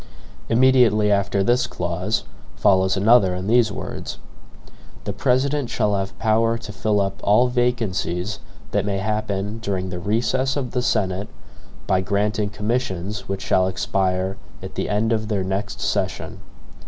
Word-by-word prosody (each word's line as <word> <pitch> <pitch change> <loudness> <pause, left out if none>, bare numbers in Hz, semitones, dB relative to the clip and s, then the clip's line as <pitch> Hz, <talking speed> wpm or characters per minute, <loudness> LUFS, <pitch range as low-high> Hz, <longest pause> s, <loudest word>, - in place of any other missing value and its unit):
Immediately 115 -4 +4
after 100 0 +1
this 120 +4 +2
clause 90 +5 -2 0.3
follows 95 -1 +3
another 100 -2 +4
in 90 +1 -4
these 115 0 +3
words: - - -6 0.9
"The 100 - -3
President 130 +4 +1
shall 105 -3 +1
have 95 0 -3
power 115 +1 +2
to 110 - -8
fill 105 0 +1
up 95 -1 -2
all 120 +5 +4
VACANCIES 110 -6 -1 0.3
that 100 - +1
may 100 -1 -1
happen 105 0 -2
DURING 95 -4 -3
THE 90 - -4
RECESS 125 +8 0
OF 130 -4 -3
THE 125 - 0
SENATE, 95 -4 0 0.6
by 95 -1 +2
granting 105 +2 0
commissions 105 -3 -3
which 95 0 -3
shall 95 0 +2
EXPIRE 95 +1 -1 0.3
AT - - -7
THE - - -3
END 110 +2 +1
OF 110 -1 -1
THEIR 100 -3 0
NEXT 95 +2 -3
SESSION." - - -2
105 Hz, 145 wpm, -22 LUFS, 95-115 Hz, 0.9 s, Immediately